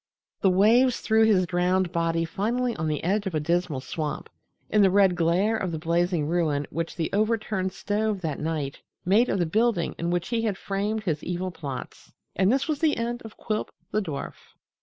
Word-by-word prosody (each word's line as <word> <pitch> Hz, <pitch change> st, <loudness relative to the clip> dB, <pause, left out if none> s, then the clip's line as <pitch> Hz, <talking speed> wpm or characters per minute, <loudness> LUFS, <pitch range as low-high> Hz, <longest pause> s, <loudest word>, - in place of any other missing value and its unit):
The 195 Hz, -, +4 dB
waves 230 Hz, +7 st, +4 dB
threw 220 Hz, 0 st, +3 dB
his 195 Hz, -4 st, +4 dB
drowned 180 Hz, +1 st, +1 dB
body 165 Hz, 0 st, 0 dB
finally 235 Hz, +8 st, -1 dB
on 160 Hz, -, -2 dB
the 150 Hz, -2 st, -2 dB
edge 200 Hz, +4 st, 0 dB
of 180 Hz, -, -3 dB
a -, -, +2 dB
dismal 165 Hz, -3 st, 0 dB
swamp, 155 Hz, +1 st, -4 dB, 0.4 s
in 210 Hz, -, +3 dB
the 195 Hz, -, +6 dB
red 190 Hz, -1 st, +4 dB
glare 175 Hz, +6 st, +2 dB
of 190 Hz, -5 st, -2 dB
the 160 Hz, -, -3 dB
blazing 170 Hz, 0 st, 0 dB
ruin 155 Hz, -3 st, 0 dB
which 165 Hz, 0 st, -3 dB
the 165 Hz, -2 st, -2 dB
overturned 215 Hz, -3 st, 0 dB
stove 210 Hz, 0 st, -1 dB
that 160 Hz, -4 st, -3 dB
night 150 Hz, -3 st, -3 dB, 0.2 s
made 210 Hz, +7 st, +4 dB
of -, -, +1 dB
the 175 Hz, -, +1 dB
building 215 Hz, 0 st, +1 dB
in 170 Hz, -, -1 dB
which 175 Hz, +3 st, -1 dB
he 235 Hz, -2 st, 0 dB
had 215 Hz, -4 st, -1 dB
framed 205 Hz, +2 st, -2 dB
his 160 Hz, -7 st, -2 dB
evil 180 Hz, +1 st, -3 dB
plots. 140 Hz, -7 st, -8 dB, 0.2 s
And 190 Hz, +2 st, +3 dB
this 270 Hz, +4 st, +1 dB
was 305 Hz, -3 st, -1 dB
the 310 Hz, -2 st, +2 dB
end 240 Hz, +1 st, -2 dB
of 220 Hz, -1 st, -11 dB
Quilp, 215 Hz, -1 st, -2 dB, 0.2 s
the 215 Hz, -, +1 dB
dwarf. 155 Hz, -8 st, -7 dB
185 Hz, 200 wpm, -26 LUFS, 165-215 Hz, 0.4 s, the